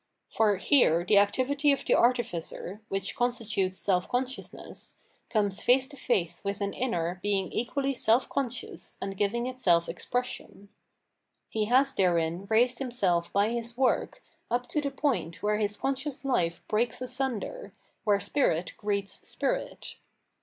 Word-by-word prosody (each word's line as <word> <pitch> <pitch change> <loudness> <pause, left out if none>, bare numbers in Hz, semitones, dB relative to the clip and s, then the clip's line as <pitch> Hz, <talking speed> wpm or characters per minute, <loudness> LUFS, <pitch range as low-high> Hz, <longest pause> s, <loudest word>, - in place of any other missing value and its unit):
For 210 -3 +2
here 180 - +3
the 200 +2 +6
activity 275 +8 +2
of 275 - -1
the - - +3
artificer, 215 -4 0
which 195 0 -3
constitutes 220 -6 0
self 180 -2 +1
consciousness, 255 +1 -5 0.3
comes 205 -2 0
face 260 +1 +4
to 290 - -11
face 195 -10 -1
with 200 +1 -2
an 200 -1 -2
inner 180 -8 -2
being 195 -2 0
equally 275 +4 -1
self 240 0 +2
conscious 250 -4 -3
and 195 0 -4
giving 210 +5 0
itself 195 -10 +2
ex - - -7
pression. 245 -4 -4 0.8
He 215 -1 0
has 265 +4 +3
therein 175 0 +1
raised 240 +3 +3
himself 195 -10 0
by 200 +2 +2
his 235 0 -3
work 260 -1 +1 0.3
up 245 +1 0
to 300 - 0
the 285 - -1
point 265 - -2
where 210 0 +2
his 210 -1 -1
conscious 275 +1 -2
life 170 -11 0
breaks 230 +3 0
asunder, 255 - -2 0.3
where 205 -2 +3
spirit 200 - 0
greets 200 -1 -1
spirit. - - -3
220 Hz, 145 wpm, -28 LUFS, 195-255 Hz, 0.8 s, the